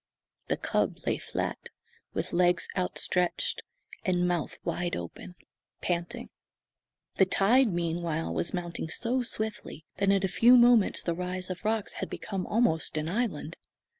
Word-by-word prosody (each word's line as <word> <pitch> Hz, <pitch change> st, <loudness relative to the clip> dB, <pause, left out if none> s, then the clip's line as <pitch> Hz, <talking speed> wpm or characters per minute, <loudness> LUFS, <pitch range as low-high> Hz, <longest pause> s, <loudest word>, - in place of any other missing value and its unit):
The -, -, 0 dB
cub -, -, 0 dB
lay -, -, 0 dB
flat, -, -, -4 dB, 0.5 s
with -, -, -3 dB
legs 175 Hz, 0 st, +3 dB
outstretched 180 Hz, -1 st, 0 dB, 0.4 s
and 180 Hz, -1 st, +1 dB
mouth 175 Hz, -3 st, -1 dB
wide 175 Hz, 0 st, -1 dB
open, 85 Hz, -, -7 dB, 0.4 s
panting. 180 Hz, +8 st, -3 dB, 0.9 s
The 190 Hz, -, +5 dB
tide, 220 Hz, +6 st, +4 dB
meanwhile, 170 Hz, -, -1 dB
was 85 Hz, +1 st, 0 dB
mounting 175 Hz, -2 st, -4 dB
so 245 Hz, +8 st, 0 dB
swiftly 220 Hz, -8 st, -4 dB
that 200 Hz, +1 st, +2 dB
in 195 Hz, -1 st, +3 dB
a -, -, +2 dB
few 230 Hz, +7 st, +6 dB
moments 240 Hz, -4 st, +5 dB
the 170 Hz, -, 0 dB
rise 180 Hz, +1 st, -3 dB
of 180 Hz, -, -6 dB
rocks 220 Hz, -1 st, 0 dB
had -, -, -3 dB
become 195 Hz, -4 st, -4 dB
almost 205 Hz, -9 st, +1 dB
an 155 Hz, +1 st, -1 dB
island. 180 Hz, -7 st, -2 dB
180 Hz, 140 wpm, -29 LUFS, 170-215 Hz, 0.9 s, few